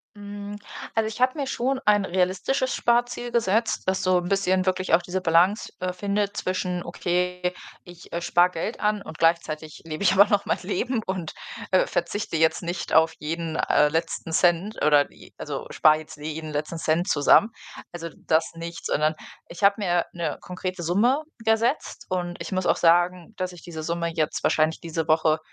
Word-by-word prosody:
Hm, 205 0 -7 0.4
also 225 -1 +1
ich 220 +2 -6
habe 255 +4 +2
mir 275 - -1
schon 265 +1 -1
ein 205 -1 +4
realistisches 190 +9 0
Sparziel 240 0 0
gesetzt, 225 0 +1
das 190 0 0
so 185 -1 +3
'n 175 0 -5
bisschen 190 -1 +1
wirklich 185 -1 0
auch 165 - +6
diese 180 +2 -3
Balance, 180 +5 +2
äh, 185 0 -1
findet 200 +2 -2
zwischen: 180 -1 -2
„Okay, 180 +1 -1 0.3
ich, 175 -1 -14
äh, 170 - -2
spare 175 +1 +3
Geld 180 +7 -4
an 210 -1 0
und 160 - -10
gleichzeitig 160 -2 0
lebe 155 +3 -5
ich 190 - +5
aber 195 +1 +7
noch 205 -1 +1
mein - - 0
Leben“, 220 +6 -1
und, 185 -4 -3 0.4
äh, 185 - +4
verzichte 175 0 -2
jetzt 160 0 +2
nicht 170 0 -4
auf 160 0 +5
jeden, 165 +1 -4
äh, 150 -2 +3
letzten 165 +1 -2
Cent 175 +5 +2
oder 145 -1 +5
die - - -17
also, - - -5
spare 155 0 +5
jetzt 155 - -11
jeden 155 +1 -6
letzten 150 +3 -3
Cent 160 +2 0
zusammen. 150 +9 +5 0.4
Also 170 -1 -6 0.2
das 160 0 +2
nicht, 170 0 -7
sondern 155 +1 +1 0.3
ich 170 +3 -9
habe 200 0 +6
mir 175 -4 +1
'ne 170 -4 -3
konkrete 185 0 -5
Summe 235 - +2 0.2
gesetzt 225 +5 0
und 175 -1 -2
ich - - -6
muss 185 -1 -1
auch - - +3
sagen, 175 +3 +2
dass 185 -1 -2
ich 175 -2 -13
diese 160 -2 -7
Summe 170 +1 -2
jetzt 155 -2 -1
wahrscheinlich 155 +1 +2
diese 165 -1 -3
Woche 155 0 +3
180 Hz, 185 wpm, -25 LUFS, 165-200 Hz, 0.4 s, aber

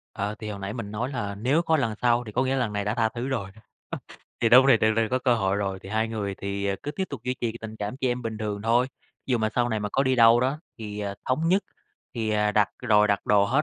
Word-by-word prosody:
Ờ, 105 +2 -2
thì 110 -1 -5
hồi 100 - -6
nãy 100 +2 -4
mình 105 -4 -6
nói 115 +5 -2
là 100 -6 -3
nếu 130 +10 +1
có 160 -2 +2
lần 115 -6 0
sau, 120 0 +3
thì 105 - -8
có 125 +4 +1
nghĩa 130 - -1
là - - 0
lần 115 -4 -1
này 100 0 -2
đã 105 - 0
tha 115 -2 +2
thứ 120 +1 -5
rồi, 120 -8 -2
ơ, 110 - -17 0.8
thì 115 - +3
đâu 125 +3 +8
có 135 - +2
thể 135 - +7
tưởng 110 0 +2
tượng 115 -1 +2
có 130 +2 +1
cơ 125 -1 +2
hội 100 -3 0
rồi 95 -2 -2
thì 95 - -9
hai 110 +2 0
người 105 -3 -3
thì, 100 +1 -3
à, 100 - 0
cứ 145 - -3
tiếp 190 +5 -2
tục 140 - -6
duy 125 - -1
trì 115 -2 -1
tình 110 0 -7
cảm 105 +3 -4
chị 135 -1 -1
em 125 0 -2
bình 110 -2 -4
thường 105 -1 -3
thôi. 120 +3 +3 0.4
Dụ 125 -3 +1
mà 110 -1 +1
sau 120 -1 +2
này 110 -2 -1
mà 105 - -2
có 135 - +2
đi 130 -1 +2
đâu 115 0 +7
đó 130 +4 0 0.2
thì, 105 -2 -6
à, 100 -1 -3
thống 155 +6 +1
nhất 190 +3 +3 0.5
thì, 110 -3 -1
à, 105 0 +1
đặt 105 -1 +3
rồi, 105 -4 +4
đặt 100 -1 0
đồ 100 -1 +5
hết 135 +8 +2
110 Hz, 305 wpm, -26 LUFS, 105-125 Hz, 0.8 s, đâu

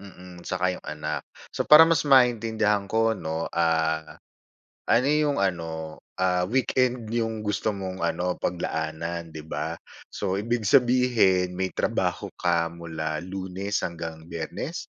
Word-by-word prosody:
mm, 90 -3 -12
'tsaka 90 0 -1
'yong - - -15
anak. 75 0 -4 0.3
So, - - -1
para 155 +2 +10
mas 165 -1 +2
maintindihan 110 -5 +3
ko, 115 +1 +2
'no, 80 -2 -3
ah, 80 -2 0 0.7
ano 120 +3 +4
'yong 150 -1 +2
ano, 80 -4 -3 0.2
ah, 90 -1 +2
weekend 125 -1 +1
'yong 110 -2 -1
gusto 105 +1 0
mong 95 -2 -5
ano 90 +2 -1
paglaanan, 85 0 -3
'di 80 - -6
ba, - - -3 0.4
so, 95 -2 -3
ibig 115 +1 -1
sabihin 120 -8 +4
may 95 0 0
trabaho - - -1
ka 85 -1 +2
mula 80 -2 -4
lunes 95 +1 -5
hanggang 80 -2 -6
biyernes? 80 -2 -5
90 Hz, 130 wpm, -26 LUFS, 85-110 Hz, 0.7 s, para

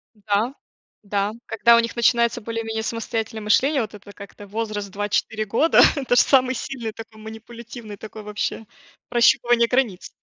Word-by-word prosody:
М-да. 210 +4 -1 0.5
Да. 205 +1 -1
Когда 235 +1 +4
у - - +5
них 230 +1 -2
начинается 235 0 +2
более-менее 225 0 -4
самостоятельное 225 -1 -4
мышление, 270 +6 +3
вот 215 -1 -5
это 205 0 -12
как-то 200 0 -12
возраст 210 -1 -4
2-4 205 +2 -1
года, 260 +11 +4
это 260 -3 0
же - - +7
самый 260 -1 +3
сильный 230 -3 -5
такой, 220 -1 -11
манипулятивный 225 0 -10
такой, 215 0 -10
вообще 210 +1 -4 0.4
прощупывание 235 0 +4
границ. 240 -8 -1
225 Hz, 145 wpm, -22 LUFS, 210-235 Hz, 0.5 s, же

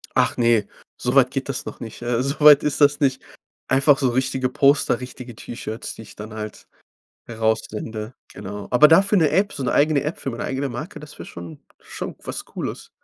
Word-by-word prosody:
Ach - - +2
ne, 115 -3 +3 0.3
so - - -2
weit - - +5
geht - - -4
das - - -3
noch - - -8
nicht. 115 0 -9
Äh, 120 0 0
so 140 +3 -2
weit 150 -1 +8
ist 150 0 -1
das 145 +1 +5
nicht. 135 -2 +1 0.5
Einfach 135 +1 +4
so 130 -3 +1
richtige 130 +1 0
Poster, 140 +1 +3
richtige 125 -2 -9
T-Shirts, 115 0 -7
die 110 - -10
ich - - -15
dann 110 +1 -9
halt 110 -1 -8 0.6
heraus 110 -1 0
sende. 110 +1 -6 0.2
Genau. 100 +1 -7
Aber 150 +5 +7
dafür 195 +5 +5
'ne 155 -3 +3
App, 200 +2 +1
so 140 - -5
'ne 125 - 0
eigene 145 -1 +3
App 150 - -3
für 135 - -4
meine 115 - -5
eigene 135 +1 -2
Marke, 120 +7 -7
das 150 0 -12
wäre - - -8
schon 85 -3 -10 0.2
schon - - -7
was - - -5
Cooles. - - -6
130 Hz, 205 wpm, -22 LUFS, 115-145 Hz, 0.6 s, weit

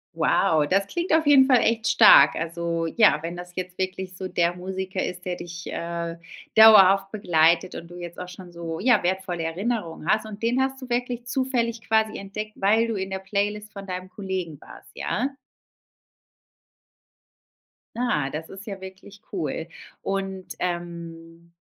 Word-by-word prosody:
Wow, 155 -2 +2
das 195 +1 +2
klingt 345 - -3
auf 320 0 +3
jeden 280 -2 +7
Fall 255 -2 +6
echt 225 0 +1
stark. - - +7
Also 165 0 -2
ja, 210 +4 +4
wenn 170 +1 -4
das 180 0 -9
jetzt 185 0 -6
wirklich 185 0 -3
so 185 +1 -5
der 170 -1 +1
Musiker 190 +1 -4
ist, 180 0 -6
der 180 -1 -3
dich, 170 -1 -8
äh, 170 0 -4 0.4
dauerhaft 195 -3 +8
begleitet 170 -4 +2
und 170 - -8
du 175 - -11
jetzt 175 0 -8
auch 180 - -6
schon 180 -1 -11
so, 165 -1 -6
ja, 240 0 +4
wertvolle 180 -1 -2
Erinnerungen 170 -1 -3
hast 220 +2 +1
und 210 +1 -10
den 245 +3 +2
hast 265 0 -1
du - - -7
wirklich 245 0 -2
zufällig 245 -3 -1
quasi 220 -1 +1
entdeckt, 215 +2 -6
weil 220 +4 +2
du 225 - -2
in 190 -1 -3
der 190 - -3
Playlist 205 +2 -3
von 200 -1 -9
deinem 185 0 -5
Kollegen 185 -7 -5
warst, - - -14
ja? 270 +2 -2 2.6
Ah, 190 - 0
das 160 +2 -6
ist 195 +2 -10
ja 195 -3 -7
wirklich 190 +2 -12
cool. 165 -3 -3 0.3
Und, 195 -1 -4
ähm 170 -1 -6
190 Hz, 165 wpm, -24 LUFS, 170-220 Hz, 2.6 s, dauerhaft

